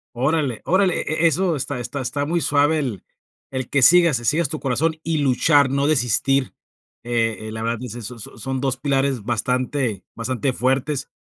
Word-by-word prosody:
Órale 135 -1 0
órale 185 0 +2
e 160 +2 -1
e - - +8
eso 170 +2 +2
está 140 -1 -3
está 120 +4 -5
está 145 +2 -2
muy 170 +3 0
suave 145 +1 +2
el 125 - -3 0.5
el 130 -2 -4
que 140 - +2
sigas 170 -2 +6
que 120 - -10
sigas 155 +4 +1
tu 155 +1 -4
corazón 155 +5 0
y 165 -1 -1
luchar, 140 +1 +3
no 140 +1 +1
desistir. 135 -1 +1 0.5
Eh 115 -2 -1
eh, - - -7
la 110 0 -5
verdad, 115 0 -1
pues 125 -2 -7
eso 120 0 -7
so 105 - -6
so - - -16
son 130 +4 -3
2 135 -1 0
pilares 135 -3 0
bastante 125 -1 -1
bastante 130 +3 -2
fuertes. 130 +3 -1
135 Hz, 190 wpm, -21 LUFS, 120-150 Hz, 0.5 s, e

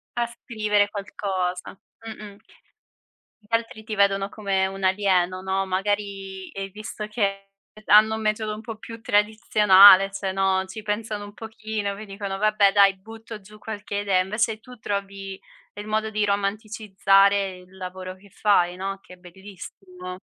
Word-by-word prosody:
A 240 0 +1
scrivere 215 -4 0
qualcosa. 190 -3 -4 0.3
Mh-mh. 210 -2 -9 1.1
Gli 230 - +4
altri 230 -1 -4
ti 215 - -4
vedono 195 0 +2
come 195 -2 -1
un 195 0 -7
alieno, 185 -2 +2
no, 190 0 -1
magari 195 0 -3
e 195 0 -5
visto 210 +1 -7
che 195 -2 -1 0.4
hanno 220 +1 +6
un 220 - -5
metodo 215 0 -1
un 215 - -7
po' 225 -1 -7
più 230 +1 -10
tradizionale, 205 -2 +6
cioè, 195 -1 -3
no, 190 0 +1
ci 200 +3 -8
pensano 210 0 -3
un 205 0 -10
pochino, 215 -2 -4
poi 215 +2 -9
dicono 195 -1 -5
vabbè 210 -1 +3
dai 200 -1 +5
butto 225 +2 -10
giù 210 +2 -16
qualche 210 -1 -6
idea, 195 -2 +2
invece 215 +3 -1
tu 250 +2 -14
trovi 195 -1 -5 0.4
il 205 +1 -7
modo 220 0 0
di 210 -1 0
romanticizzare 200 -1 +2
il 185 +1 -18
lavoro 185 0 -7
che 200 +1 -19
fai, 180 -3 +2
no, 195 +1 -4
che - - -15
è - - -14
bellissimo. 185 0 -11
200 Hz, 155 wpm, -24 LUFS, 190-215 Hz, 1.1 s, hanno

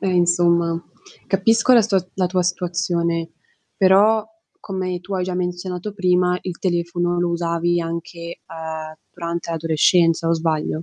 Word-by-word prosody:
Eh 195 - -2
insomma, 170 -1 +2 0.5
capisco 225 +6 +3
la 235 - +7
stua 200 -2 +2 0.2
la 185 -2 +1
tua 180 0 0
situazione, 170 -2 -1 0.5
però, 205 +3 +4 0.4
come 185 -2 -4
tu 190 +3 -6
hai 185 -1 0
già 185 0 -3
menzionato 180 +2 -3
prima, 180 -2 +2
il 180 -2 -5
telefono 175 -1 0
lo 175 0 +1
usavi 170 0 0
anche, 170 0 -6
uhm, 160 -1 -6 0.2
durante 170 -1 -5
l'adolescenza, 165 +1 +2
o - - +3
sbaglio? 160 -1 -1
175 Hz, 140 wpm, -21 LUFS, 170-185 Hz, 0.5 s, la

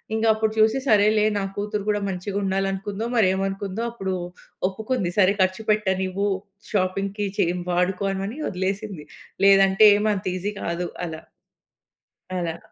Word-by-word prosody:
ఇంగప్పుడు 220 -1 +2
చూసి 220 +3 +4
సరేలే! 215 0 +4
నా 200 - -1
కూతురు 205 0 -3
కూడా 205 -1 +1
మంచిగా 190 +2 -4
ఉండాలనుకుందో, 195 +2 -2
మరేమనుకుందో. 195 0 0
అప్పుడు 195 -5 -3 0.6
ఒప్పుకుంది. 205 -2 -2
సరే 195 0 +5
ఖర్చు 185 +3 +1
పెట్టనివ్వు 190 -1 0 0.4
షాపింగ్‌కి 195 +1 -1
చేయన్ 175 +1 +1
వాడుకోమని 195 - -1
వదిలేసింది. 190 -2 -3 0.4
లేదంటే 195 +1 +6
ఏమంత 210 -2 0
ఈజీ 200 +3 -3
కాదు 170 +1 -2 0.2
అలా. 160 -1 -6 1.1
అలా. 170 -2 -2
195 Hz, 115 wpm, -24 LUFS, 185-210 Hz, 1.1 s, లేదంటే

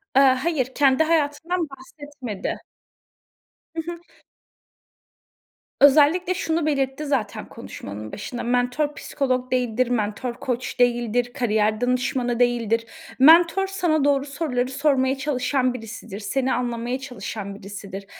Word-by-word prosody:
Eee, 270 - +7
hayır, 260 -2 -1
kendi 275 +1 +4
hayatından 320 +2 0
bahsetmedi. 275 -5 -7 1.1
Hı 325 - -1
hı. 345 - -7 1.8
Özellikle 300 +6 +5
şunu 330 -4 -1
belirtti 275 -1 -1
zaten, 260 -8 -2
konuşmanın 105 +2 -8
başında. 240 +4 -6
Mentor, 250 +5 0
psikolog 255 -3 -2
değildir, 250 -1 +1
mentor, 230 +1 -1
koç 250 +1 -4
değildir, 240 0 +1
kariyer 215 -4 +1
danışmanı 245 -1 0
değildir. 230 -2 +1 0.3
Mentor, 335 +6 +6
sana 350 -6 +1
doğru 280 -1 +2
soruları 275 -4 -2
sormaya 270 -1 +1
çalışan 265 -2 0
birisidir, 220 -4 -8
seni 260 +5 -1
anlamaya 240 +1 -2
çalışan 225 -6 -6
birisidir. 200 -1 -8
255 Hz, 110 wpm, -23 LUFS, 240-290 Hz, 1.8 s, Eee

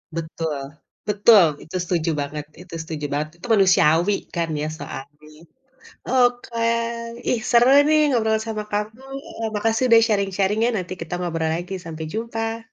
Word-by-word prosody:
Betul 155 -4 -4 0.4
betul 205 -2 +6 0.2
itu 160 - -10
setuju 170 -2 -1
banget 145 +1 -5 0.2
itu 180 -2 -14
setuju 155 -2 -5
banget 150 +1 -1
itu - - -7
manusiawi 185 -2 +4 0.2
kan 165 -1 -1
ya 150 - -2
soalnya 150 +1 -10 0.7
oke, 245 -2 +1 0.7
ih, 240 - +1
seru 240 +1 +5 0.2
nih 310 0 +4
ngobrol 220 -4 +1
sama 220 -1 -4
kamu, 215 +4 -3 0.3
eee, 225 -1 -2
makasih 225 +3 +1
udah 225 - +9
sharing-sharing-nya 200 +2 +1
nanti 185 -1 -4
kita 165 - -8
ngobrol 165 -2 -1
lagi 175 +3 -4
sampai 160 -1 -6
jumpa. 225 +1 -3
195 Hz, 140 wpm, -22 LUFS, 160-225 Hz, 0.7 s, udah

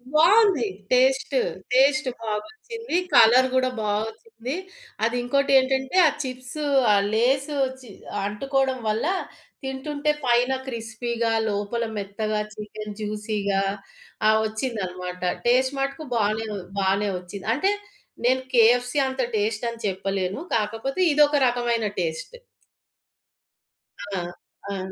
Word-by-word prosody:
బావుంది 355 - +5 0.2
taste. 265 - +3 0.4
Taste 275 +2 +4 0.2
బాగొచ్చింది. 435 - -5 0.2
Colour 245 +2 +7
గూడా 255 0 +2
బాగొచ్చింది. 225 +4 -3 0.5
అది 230 +2 +1
ఇంకోటేంటంటే 265 +2 +2
ఆ - - +5
చిప్సు, 255 +3 -5 0.3
ఆ - - +5 0.2
లేసు 270 +6 +1 0.2
చి 250 - -13 0.4
అంటుకోవడం 265 +5 0
వల్ల 215 +4 0 0.6
తింటుంటే 285 +3 -1
పైన 245 +1 +3 0.2
క్రిస్పీగా 230 -1 -2 0.2
లోపల 205 +3 -2
మెత్తగా 210 +2 -2
చికెన్ 210 0 -7
జ్యూసీ‌గా 210 -2 -1 0.7
ఆ! - - +7 0.2
వచ్చిందనమాట. 185 -6 -4 0.3
టేస్ట్ 260 +3 +3
మటుకు 275 +3 -2
బానే 220 0 +1 0.3
బానే 195 +1 +1
వచ్చింది 185 +3 -9
అంటే 390 +7 +2 0.5
నేను 260 +1 +3
కేఎఫ్‌సి 245 +3 +4
అంత 260 0 -2
టేస్ట్ 215 +2 -1
అని 235 0 -8
చెప్పలేను. 195 +1 -2 0.2
కాకపోతే 225 - -2
ఇదొక 295 0 +4
రకమైన 240 -2 0
టేస్ట్. 165 - -3 1.8
ఆ! - - 0 0.5
ఆ! 200 - -3
235 Hz, 105 wpm, -24 LUFS, 210-265 Hz, 1.8 s, Colour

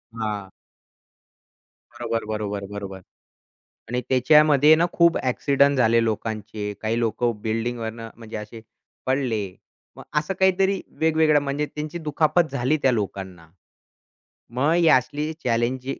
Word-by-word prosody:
हां. 105 -4 -4 1.4
बरोबर, 115 -1 -3
बरोबर, 105 -2 -4
बरोबर 100 -2 -6 0.9
आणि 125 +1 -1
त्याच्यामध्ये 150 +3 +5
ना 165 +2 +2
खूप 170 -1 +4
अ‍ॅक्सिडेंट 140 +2 +2
झाले 115 -1 +4
लोकांचे. 110 -1 -3
काही 110 +2 -1
लोक 115 +1 -2 0.2
बिल्डिंगवरनं 115 0 -3
म्हणजे 110 -1 -8
असे 105 +2 -9 0.4
पडले. 130 -6 0 0.5
मग - - -11 0.2
असं 155 +5 -4
काहीतरी 190 0 +2 0.2
वेगवेगळं 160 -1 +3
म्हणजे 145 +1 -2
त्यांची 150 +2 -4
दुखापत 155 0 +1
झाली 140 +3 +1
त्या 130 - +4
लोकांना. 95 -6 -4 1.1
मग 140 +5 +2
ही 170 -1 +4
असली 150 +3 +2
चॅलेंज 120 +2 0
125 Hz, 115 wpm, -23 LUFS, 110-150 Hz, 1.4 s, त्याच्यामध्ये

